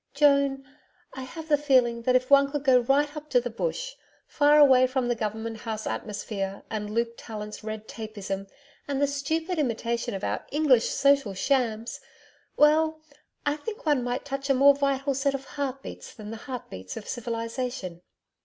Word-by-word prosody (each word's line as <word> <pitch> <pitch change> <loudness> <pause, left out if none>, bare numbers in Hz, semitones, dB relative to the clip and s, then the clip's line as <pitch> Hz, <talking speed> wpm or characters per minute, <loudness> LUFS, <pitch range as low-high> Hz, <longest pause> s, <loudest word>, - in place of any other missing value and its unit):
Joan, 280 -2 +3 0.5
I 265 - -7
have 320 +5 -8
the 295 -2 +3
feeling 255 -5 +3
that 255 +2 +2
if 255 +1 +1
one 280 0 +6
could 290 -1 -3
go 260 -3 +6
right 285 +4 +1
up 305 0 -8
to 250 - +4
the 245 0 -4
Bush - - -3 0.3
far 295 0 +4
away 260 -3 +7
from 255 -1 -1
the 240 - +2
Government 220 +1 -4
House 220 -1 -5
atmosphere 200 -2 -4
and 210 -1 -3
Luke 230 +2 -1
Tallant's 210 -1 -7
red 215 0 -6
tapism 200 -3 -5 0.4
and 280 -1 -1
the 285 - +4
stupid 315 +5 -2
imitation 235 -5 -1
of 195 - -6
our - - -2
English 275 -5 +3
social 275 -8 +2
shams 230 0 0 0.6
well, 315 +1 +4 0.5
I 290 0 +2
think 425 +9 -7
one 290 -5 +2
might 245 +2 -3
touch 275 0 -4
a 275 - +4
more 280 +2 +7
vital 275 0 0
set 275 +1 0
of 270 0 -6
heart 275 -2 -4
beats - - -9
than 215 -2 -8
the 225 - -6
heart 255 -2 -6
beats 95 0 -7
of 210 - -8
civilization.' 230 -5 -4
260 Hz, 180 wpm, -27 LUFS, 225-285 Hz, 0.6 s, away